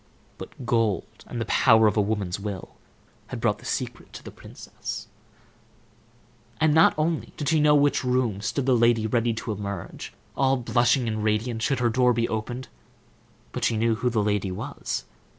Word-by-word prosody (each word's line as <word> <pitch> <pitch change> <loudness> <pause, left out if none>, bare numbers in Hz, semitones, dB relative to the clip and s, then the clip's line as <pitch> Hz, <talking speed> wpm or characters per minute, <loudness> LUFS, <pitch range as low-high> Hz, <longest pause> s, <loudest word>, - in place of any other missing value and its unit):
But 130 - -9
gold, 115 -6 -1
and 120 - -5
the 115 - -1
power 110 -3 +5
of 105 - +3
a 105 - +3
woman's 100 -3 -2
will, 100 -2 -6 0.5
had - - -6
brought - - +1
the - - -14
secret - - -4
to - - -9
the - - -9
princess. - - -8 1.5
And 155 -1 +3
not 160 +1 +5
only 160 +1 -1
did 145 -2 -1
she 160 - +3
know 150 0 +5
in 145 - +4
which 145 - +2
room 125 -5 0
stood 125 +5 -2
the 130 -1 +4
lady 115 -1 +3
ready 115 0 +1
to 115 - -4
emerge, 100 -1 -6 0.2
all 135 0 +2
blushing 120 0 +2
and 110 -1 -2
radiant, 110 +2 0
should 135 +4 +1
her 120 -1 +2
door 125 +1 +3
be 115 0 0
opened, 120 +3 -4 0.8
but - - -5
she 115 - +2
knew 115 +1 +2
who 125 +3 0
the 110 -3 +1
lady 105 -2 0
was. 90 - -4
115 Hz, 185 wpm, -25 LUFS, 110-130 Hz, 1.5 s, power